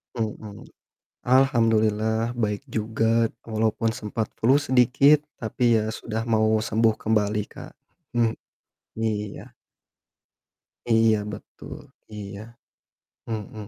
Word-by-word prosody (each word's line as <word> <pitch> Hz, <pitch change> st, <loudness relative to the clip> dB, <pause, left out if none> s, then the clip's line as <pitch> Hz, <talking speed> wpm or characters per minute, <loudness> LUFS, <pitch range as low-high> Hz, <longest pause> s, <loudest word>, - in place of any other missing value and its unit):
Mhm. 110 Hz, -2 st, -5 dB, 0.6 s
Alhamdulillah 115 Hz, -3 st, +2 dB
baik 110 Hz, 0 st, -2 dB
juga, 115 Hz, -1 st, +1 dB, 0.2 s
walaupun 110 Hz, 0 st, 0 dB
sempat 110 Hz, 0 st, -4 dB
flu 125 Hz, +5 st, +4 dB
sedikit, 140 Hz, +2 st, +4 dB, 0.2 s
tapi 115 Hz, +1 st, +1 dB
ya 110 Hz, 0 st, -1 dB
sudah 110 Hz, 0 st, -4 dB
mau 110 Hz, -1 st, +2 dB
sembuh 110 Hz, 0 st, +1 dB
kembali 105 Hz, -1 st, +1 dB
Kak. -, -, -10 dB, 0.4 s
Mmm, 115 Hz, -2 st, +2 dB, 0.7 s
iya. 105 Hz, -2 st, -3 dB, 1.4 s
Iya 115 Hz, -1 st, +4 dB
betul, -, -, -10 dB, 0.3 s
iya. 105 Hz, +2 st, -9 dB, 0.7 s
Mhm. 110 Hz, -2 st, -6 dB
110 Hz, 90 wpm, -24 LUFS, 110-115 Hz, 1.4 s, flu